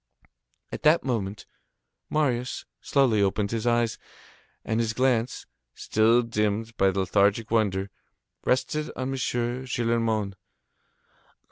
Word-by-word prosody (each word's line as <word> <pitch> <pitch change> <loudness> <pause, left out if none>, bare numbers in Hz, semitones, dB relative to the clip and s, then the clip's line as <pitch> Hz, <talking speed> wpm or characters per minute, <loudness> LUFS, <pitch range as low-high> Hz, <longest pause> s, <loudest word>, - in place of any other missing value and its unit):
At - - -5
that 155 +3 +4
moment, 105 -6 -3 0.6
Marius 125 -5 -1 0.2
slowly 130 -7 +2
opened 100 +1 0
his 115 0 -2
eyes, 120 -1 +1 0.7
and 110 +1 0
his 115 -1 0
glance, 125 -1 0 0.3
still 115 +3 +3
dimmed 110 0 -1
by 95 -1 +3
lethargic 100 +3 +1
wonder, 100 -4 +1 0.5
rested 150 +4 0
on 130 0 -3
M. - - -2
Gillenormand. 120 -4 -1
115 Hz, 105 wpm, -26 LUFS, 105-125 Hz, 0.7 s, that